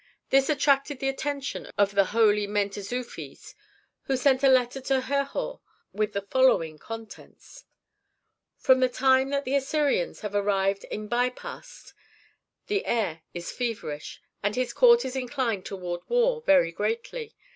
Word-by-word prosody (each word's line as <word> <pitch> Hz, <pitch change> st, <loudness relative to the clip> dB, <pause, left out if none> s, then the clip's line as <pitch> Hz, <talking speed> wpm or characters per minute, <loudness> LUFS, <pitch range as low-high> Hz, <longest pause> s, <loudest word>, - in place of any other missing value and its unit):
This 270 Hz, +1 st, +4 dB
attracted 280 Hz, -1 st, +2 dB
the 270 Hz, +1 st, -1 dB
attention 280 Hz, +1 st, -4 dB
of 200 Hz, -1 st, +3 dB
the 200 Hz, -1 st, +3 dB
holy 210 Hz, 0 st, +3 dB
Mentezufis, 205 Hz, +4 st, -4 dB, 0.5 s
who 270 Hz, -, 0 dB
sent 260 Hz, 0 st, +3 dB
a 275 Hz, -, +5 dB
letter 255 Hz, 0 st, +2 dB
to 265 Hz, 0 st, +1 dB
Herhor 280 Hz, -, -2 dB, 0.3 s
with 210 Hz, 0 st, -1 dB
the 200 Hz, -, -2 dB
following 200 Hz, -9 st, +2 dB
contents: 225 Hz, -, -11 dB, 0.9 s
"From 260 Hz, 0 st, +4 dB
the 255 Hz, 0 st, +3 dB
time 265 Hz, +1 st, +3 dB
that 280 Hz, 0 st, -1 dB
the 260 Hz, -, -2 dB
Assyrians 295 Hz, -, 0 dB
have 210 Hz, -2 st, -5 dB
arrived 195 Hz, -1 st, +1 dB
at 210 Hz, 0 st, -6 dB
Pi 245 Hz, +1 st, +2 dB
Bast -, -, -11 dB, 0.7 s
the 405 Hz, -1 st, -1 dB
heir 190 Hz, -9 st, -1 dB
is 175 Hz, 0 st, -5 dB
feverish, 225 Hz, -12 st, -5 dB, 0.2 s
and 205 Hz, +1 st, -1 dB
his 255 Hz, -1 st, -1 dB
court 475 Hz, -1 st, +6 dB
is 260 Hz, -, -4 dB
inclined 250 Hz, -6 st, -2 dB
toward 175 Hz, -3 st, -5 dB
war 485 Hz, 0 st, +2 dB
very 280 Hz, -, +4 dB
greatly. 230 Hz, -, -4 dB
255 Hz, 145 wpm, -26 LUFS, 205-280 Hz, 0.9 s, court